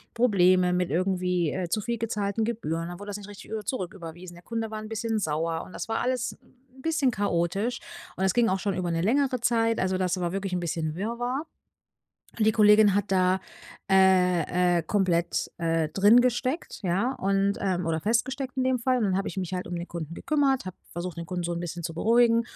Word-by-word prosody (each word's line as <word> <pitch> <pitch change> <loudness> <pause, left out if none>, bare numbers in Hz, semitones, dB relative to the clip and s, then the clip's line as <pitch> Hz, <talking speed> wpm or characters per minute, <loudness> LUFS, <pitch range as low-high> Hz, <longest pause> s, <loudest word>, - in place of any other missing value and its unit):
Probleme 185 -6 +4
mit 180 -1 0
irgendwie, 180 -1 0
äh, 180 -2 -3
zu 215 - 0
viel 235 +2 -3
gezahlten 215 -1 -1
Gebühren 165 -8 -2
und - - -5
dann 175 +1 -8
wurde 205 0 -8
das 205 - -4
nicht 205 0 -10
richtig 205 - -12
über 220 -1 -3
zurücküberwiesen. 180 -5 -6
Der 175 - -15
Kunde 225 0 -4
war 215 - -4
‘n 215 - -8
bisschen 225 0 -1
sauer, 165 -1 -1
und 185 - -14
das - - -5
war 225 - 0
alles 250 -1 -1
‘n 255 +1 -22
bisschen 315 -4 +1
chaotisch. 200 +3 -1 0.4
Und 190 - -1
das 190 -1 +3
ging 235 -2 +3
auch 190 - 0
schon 195 +1 -1
über 180 -2 -2
‘ne 165 0 0
längere 255 +5 +2
Zeit, 230 -1 +2
also 185 0 0
das 185 0 0
war 175 -1 -1
wirklich 195 -1 -3
‘n 180 - 0
bisschen 160 -2 -2
Wirrwarr. 245 - -2 1.0
Die 215 0 +5
Kollegin 210 -2 +5
hat 205 -1 -1
da, 185 0 +3 0.5
äh, 180 -2 +3
äh, - - -1
komplett, 175 -1 0
äh, 165 -2 0
drin 205 +8 +6
gesteckt, 255 +5 -1
ja, 195 +7 +1
und, 195 -1 +1
ähm 180 -3 -1
oder 160 -1 0
festgesteckt 255 - -1
in 260 - +1
dem 260 -1 +1
Fall, 255 +2 +2
und 230 - +1
dann 190 -2 +1
habe 195 - -1
ich - - -8
mich 185 -2 -3
halt 180 -1 -4
um 175 - -4
den 170 0 -5
Kunden 170 -2 -6
gekümmert, 275 - +1
habe 185 - -6
versucht, 175 0 -5
den 170 0 -6
Kunden 180 0 -3
so 175 - -1
‘n 170 - -3
bisschen 175 0 -5
zu 165 -1 -4
beruhigen 230 +5 +4
195 Hz, 220 wpm, -27 LUFS, 175-230 Hz, 1.0 s, drin